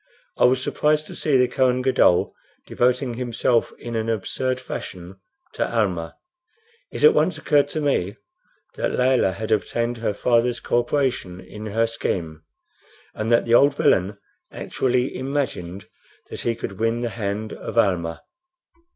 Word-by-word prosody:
I -, -, +6 dB
was 130 Hz, +1 st, +3 dB
surprised 150 Hz, +2 st, +1 dB
to -, -, -9 dB
see 145 Hz, -4 st, +2 dB
the 125 Hz, 0 st, +4 dB
Kohen 130 Hz, 0 st, +1 dB
Gadol 125 Hz, -9 st, +3 dB, 0.3 s
devoting 125 Hz, +1 st, 0 dB
himself 120 Hz, -1 st, 0 dB
in 120 Hz, -1 st, -6 dB
an 110 Hz, 0 st, -1 dB
absurd 130 Hz, +4 st, -1 dB
fashion 95 Hz, -6 st, -8 dB, 0.3 s
to -, -, -1 dB
Almah. 95 Hz, -8 st, -1 dB, 0.7 s
It -, -, -6 dB
at 455 Hz, 0 st, +8 dB
once -, -, +1 dB
occurred 145 Hz, -1 st, +2 dB
to 155 Hz, +2 st, -3 dB
me 105 Hz, -9 st, 0 dB, 0.6 s
that -, -, -1 dB
Layelah 125 Hz, -6 st, +3 dB
had 110 Hz, +2 st, -5 dB
obtained 115 Hz, +3 st, 0 dB
her 115 Hz, -3 st, -2 dB
father's 120 Hz, +2 st, +1 dB
co 120 Hz, -, +1 dB
operation 120 Hz, -8 st, -1 dB
in 105 Hz, +4 st, -9 dB
her 115 Hz, +2 st, +1 dB
scheme, 85 Hz, -8 st, -3 dB, 0.7 s
and 110 Hz, +2 st, -3 dB
that 115 Hz, -, +4 dB
the 115 Hz, -, 0 dB
old 140 Hz, +3 st, +5 dB
villain 100 Hz, -5 st, +2 dB, 0.3 s
actually 125 Hz, 0 st, -1 dB
imagined 130 Hz, -10 st, -3 dB, 0.4 s
that -, -, -5 dB
he 115 Hz, -, 0 dB
could 100 Hz, -3 st, -7 dB
win 115 Hz, +1 st, 0 dB
the 120 Hz, -, -1 dB
hand 105 Hz, -1 st, -4 dB
of -, -, -7 dB
Almah. 85 Hz, -6 st, +1 dB
115 Hz, 150 wpm, -23 LUFS, 100-130 Hz, 0.7 s, at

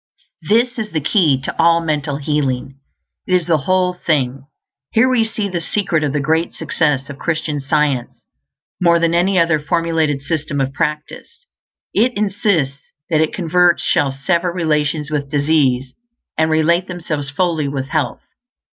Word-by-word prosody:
This 240 Hz, +3 st, +2 dB
is 215 Hz, -1 st, -3 dB
the 160 Hz, -, -1 dB
KEY 150 Hz, -3 st, +2 dB
to -, -, -4 dB
all 170 Hz, 0 st, +5 dB
mental 150 Hz, -3 st, -2 dB
healing; 140 Hz, -3 st, -2 dB, 0.5 s
it 185 Hz, -, +2 dB
is 180 Hz, -3 st, +1 dB
the 160 Hz, -2 st, +2 dB
whole 185 Hz, -1 st, +2 dB
thing. 140 Hz, -6 st, -1 dB, 0.4 s
Here 225 Hz, +3 st, +4 dB
we 250 Hz, -3 st, +3 dB
see 220 Hz, -2 st, -2 dB
the 180 Hz, -3 st, -3 dB
secret 170 Hz, -4 st, 0 dB
of 145 Hz, -, 0 dB
the 145 Hz, -, -1 dB
great 160 Hz, +4 st, 0 dB
success 145 Hz, -4 st, 0 dB
of 140 Hz, -, -9 dB
Christian 155 Hz, -3 st, -2 dB
Science; 140 Hz, -3 st, -1 dB, 0.6 s
more 170 Hz, -1 st, +5 dB
than 170 Hz, 0 st, +1 dB
any 185 Hz, +3 st, +2 dB
other 165 Hz, -2 st, +3 dB
formulated 165 Hz, -2 st, 0 dB
system 145 Hz, -1 st, -2 dB
of 135 Hz, 0 st, -1 dB
practice, 155 Hz, -, -4 dB, 0.5 s
it 240 Hz, +2 st, +2 dB
insists 195 Hz, -9 st, 0 dB, 0.3 s
that 155 Hz, -1 st, +3 dB
its 160 Hz, -, 0 dB
converts 175 Hz, -1 st, +2 dB
shall 140 Hz, -, +2 dB
sever 170 Hz, +6 st, -1 dB
relations 150 Hz, -3 st, -1 dB
with 140 Hz, -2 st, -2 dB
disease, 140 Hz, -4 st, +1 dB, 0.4 s
and 160 Hz, 0 st, +1 dB
relate 170 Hz, +3 st, +2 dB
themselves 160 Hz, -6 st, -4 dB
fully 160 Hz, -1 st, 0 dB
with 135 Hz, -1 st, -4 dB
health. 150 Hz, -4 st, -1 dB
160 Hz, 155 wpm, -18 LUFS, 145-175 Hz, 0.6 s, all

